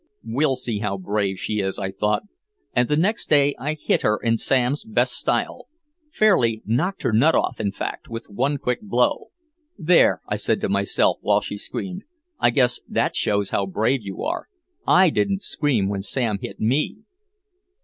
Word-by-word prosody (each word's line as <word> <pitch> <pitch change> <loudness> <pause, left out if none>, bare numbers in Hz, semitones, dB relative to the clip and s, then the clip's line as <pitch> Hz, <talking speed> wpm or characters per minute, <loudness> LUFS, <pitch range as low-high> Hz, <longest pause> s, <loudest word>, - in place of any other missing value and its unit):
"We'll 130 +4 +1
see 120 -4 -3
how 105 -2 -2
brave 100 0 -2
she 105 -1 -2
is," 95 -1 -1
I 95 -1 -3
thought, 105 +2 0 0.5
and 125 0 +2
the 150 - +2
next 205 +8 0
day 145 -1 +4
I 145 +5 -2
hit 155 - 0
her 105 0 +2
in 115 0 0
Sam's 130 +4 +1
best 220 -1 0
style, - - -2 0.4
fairly 120 - +2
"knocked 150 - -1
her - - 0
nut 140 +9 +4
off," - - 0
in 100 -2 -1
fact, - - -6
with 115 0 -6
one 135 +8 -1
quick 125 -2 -2
blow. 205 -2 0 0.5
"There," 175 -1 +4
I - - -1
said - - 0
to - - -1
myself 100 0 +1
while - - +2
she - - -5
screamed. 185 - -5 0.4
"I - - +4
guess 125 0 +2
that - - 0
shows 100 -1 0
how 100 - 0
brave 110 +7 0
you 100 -2 -7
are. 345 +3 -3 0.4
I 180 -2 +5
didn't 200 +2 0
scream 130 -10 +1
when 100 -1 -2
Sam 110 -1 -1
hit - - -7
me." 130 - 0
120 Hz, 180 wpm, -23 LUFS, 105-150 Hz, 0.5 s, I